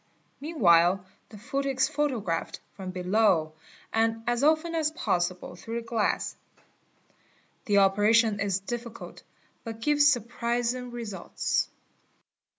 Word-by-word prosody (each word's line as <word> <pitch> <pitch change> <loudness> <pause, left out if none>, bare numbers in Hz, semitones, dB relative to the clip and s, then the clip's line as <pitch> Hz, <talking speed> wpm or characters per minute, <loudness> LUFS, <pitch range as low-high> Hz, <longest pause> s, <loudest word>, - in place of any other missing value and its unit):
Meanwhile 185 - +3 0.2
the 215 - -11
foot 275 +6 -3
is 270 -1 +2
photographed 245 - -2
from 190 -2 -7
below 180 -3 +2 0.4
and 225 0 +1
as 240 +2 0
often 315 +3 +3
as 315 -2 +1
possible, 180 - -2
through 225 +6 -7
the - - -14
glass. 225 -2 -1 1.3
The 205 -1 +2
operation 205 +2 +4
is 200 -1 0
difficult 235 +2 -7 0.4
but 225 -1 -7
gives 290 +4 +4
surprising 240 -1 0
results. 230 -5 -2
225 Hz, 110 wpm, -27 LUFS, 195-250 Hz, 1.3 s, operation